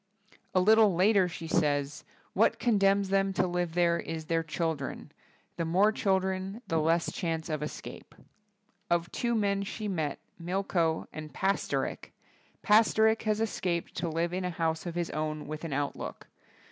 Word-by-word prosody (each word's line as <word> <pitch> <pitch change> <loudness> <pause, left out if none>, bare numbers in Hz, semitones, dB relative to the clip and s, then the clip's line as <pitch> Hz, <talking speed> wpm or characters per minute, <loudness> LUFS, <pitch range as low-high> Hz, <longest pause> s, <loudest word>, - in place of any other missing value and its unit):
A - - +6
little 215 0 +5
later 190 +1 +4
she 165 -1 -7
says, 150 -2 0 0.3
'What 215 - +3
con 230 -4 +2
denms 195 0 +3
them 195 0 +2
to 185 - +2
live 175 -2 -2
there 170 -1 +3
is 160 -1 -5
their 165 +1 +1
chil 160 +1 -1
dren; 140 -4 -7 0.5
the - - 0
more 185 +6 +3
children 190 +1 -1
the 165 - +1
less 165 +2 +1
chance 165 -2 -3
of 155 -2 -2
escape.'' 150 - -8 0.7
Of 175 0 +1
two 235 -1 -1
men 200 -2 +1
she 210 +2 -4
met, 160 -7 -2 0.2
Milko 175 -2 0
and 155 -1 -7
Pasterik, 195 +1 -1 0.5
Pasterik 220 +1 +4
has 215 0 +1
escaped 180 -6 -2
to 170 - -1
live 165 +2 -1
in 185 +1 -2
a 180 - -1
house 165 -1 -2
of 170 - -5
his 175 -1 -2
own 155 0 -3
with 155 +2 -6
an 165 - -4
outlook. 140 +1 -3
175 Hz, 165 wpm, -29 LUFS, 160-195 Hz, 0.7 s, A